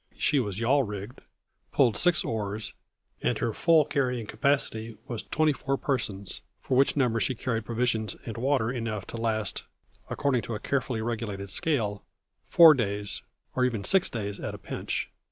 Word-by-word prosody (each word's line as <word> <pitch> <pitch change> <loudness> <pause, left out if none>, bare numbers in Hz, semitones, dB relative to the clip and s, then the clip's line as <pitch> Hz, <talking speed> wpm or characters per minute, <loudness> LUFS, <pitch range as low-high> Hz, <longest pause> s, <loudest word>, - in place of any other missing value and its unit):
She 145 - +2
was 105 -5 -2
yawl 130 +5 +3
rigged, 105 0 -6 0.5
pulled 125 -5 +3
six 175 -2 +3
oars, 105 -1 -3 0.5
and - - +1
her 115 - -1
full 160 +1 +4
carrying 125 -5 -1
capacity 115 -4 0
was 120 -5 -3
twenty 155 -1 +1
four 135 0 -2
persons, 110 -9 -1 0.2
for 130 - -1
which 135 +3 +3
number 120 -4 +2
she 120 +5 +1
carried 115 -2 -2
provisions 115 -1 0
and 115 - -5
water 125 -1 +1
enough 115 -5 -3
to - - -7
last, 110 -2 -1 0.4
according 135 -4 +1
to 115 - -5
a - - -4
carefully 125 -3 -1
regulated 105 -4 -3
scale, 105 - 0 0.4
four 165 -2 +9
days, 105 -5 -1 0.3
or 130 - +1
even 120 -5 0
six 190 - +3
days 105 -3 -4
at - - -4
a - - -8
pinch. - - -4
115 Hz, 165 wpm, -28 LUFS, 105-135 Hz, 0.5 s, four